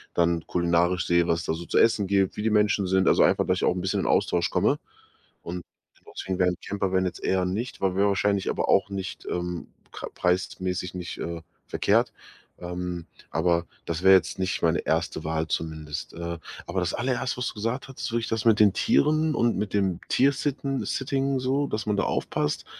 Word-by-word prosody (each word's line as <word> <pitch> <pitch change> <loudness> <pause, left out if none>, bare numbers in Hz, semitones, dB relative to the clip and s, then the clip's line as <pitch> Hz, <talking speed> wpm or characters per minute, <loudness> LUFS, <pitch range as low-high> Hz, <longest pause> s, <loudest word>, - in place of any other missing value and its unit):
dann 85 -1 +2
kulinarisch 85 +1 +1
sehe, 85 0 +3
was 85 0 0
da - - 0
so 85 +2 -6
zu - - 0
essen 105 -4 +4
gibt, 100 -1 +2
wie - - -4
die 110 - +2
Menschen 105 -2 +2
sind, 95 +1 +2
also, - - +5
einfach, - - +3
dass - - +2
ich - - -3
auch - - +3
'n 90 - -3
bisschen 95 - 0
in - - -3
Austausch - - +2
komme. - - +2 0.6
Und 90 +1 -6 0.5
deswegen 95 -1 -3
wäre 90 -1 +4
'n 90 - -2
Campervan 95 -2 0
jetzt 90 - -5
eher 95 -1 +1
nicht, 110 +7 -3
weil 95 -1 +1
wäre 100 +1 +3
wahrscheinlich 100 0 +1
aber - - -2
auch - - +4
nicht, 95 -1 -5
ähm, 90 -1 -3 0.2
k - - -6
preismäßig 90 0 -1
nicht, 90 -1 -6
äh, 85 -1 -5 0.3
verkehrt. - - +2 0.5
Ähm, 90 -1 -5 0.2
aber 85 +1 +1 0.2
das 85 +1 -3
wäre 95 0 +8
jetzt 95 - +3
nicht 95 +1 -1
meine 80 -1 +2
1. 80 - -1
Wahl 80 0 -1
zumindest. 80 -3 -4
Äh, 85 0 -5 0.3
aber 90 +2 -1
das 90 -2 -1
Allererste, 125 0 -1
was 125 - -2
du - - -5
gesagt 115 +6 -3
hattest, 130 -3 -5
würde 120 0 0
ich - - -4
das 115 0 -2
mit 110 -2 +5
den 105 -2 +7
Tieren 155 +1 +2
und 120 0 +2
mit 105 -2 -3
dem 95 -4 +1
Tiersitten 140 0 +1
Sitting, 135 0 -1
so, 135 +3 +1
dass 110 -3 -3
man 105 -1 +1
da - - +2
aufpasst, 75 0 -1
95 Hz, 205 wpm, -26 LUFS, 85-110 Hz, 0.6 s, wäre